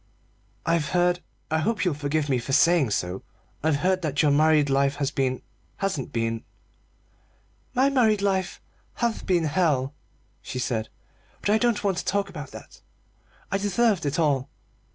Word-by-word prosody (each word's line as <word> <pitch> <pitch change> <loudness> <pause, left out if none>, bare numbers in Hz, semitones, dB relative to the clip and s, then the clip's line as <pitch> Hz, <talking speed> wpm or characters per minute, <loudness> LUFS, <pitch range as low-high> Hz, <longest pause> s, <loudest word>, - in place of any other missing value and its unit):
"I've 165 -2 +1
heard 180 0 +2 0.3
I 160 - +2
hope 205 +6 0
you'll 180 - +2
forgive 145 +1 -1
me 130 -3 +1
for 130 +3 -4
saying 165 -4 +4
so 90 -2 -2 0.4
I've 155 0 +2
heard 185 +6 +1
that 155 -2 0
your 150 - +4
married 155 0 +4
life 140 0 +2
has 140 -1 -1
been 130 -3 -1 0.3
hasn't 195 -9 -2
been 115 -1 -2 0.7
" - - -38
"My 265 +3 +4
married 220 -6 +3
life 190 -2 0 0.4
has 235 -2 -1
been 175 -3 +1
hell," 150 -4 +1 0.5
she - - -6
said; 115 -3 -2 0.5
"but 205 - +1
I 215 - +4
don't 235 -3 +1
want 195 -3 +1
to - - -6
talk 200 0 0
about 150 -6 -7
that. - - -12 0.7
I 195 - +1
deserved 205 -3 +1
it 145 - -1
all." 145 -5 +1
155 Hz, 165 wpm, -25 LUFS, 140-195 Hz, 0.7 s, saying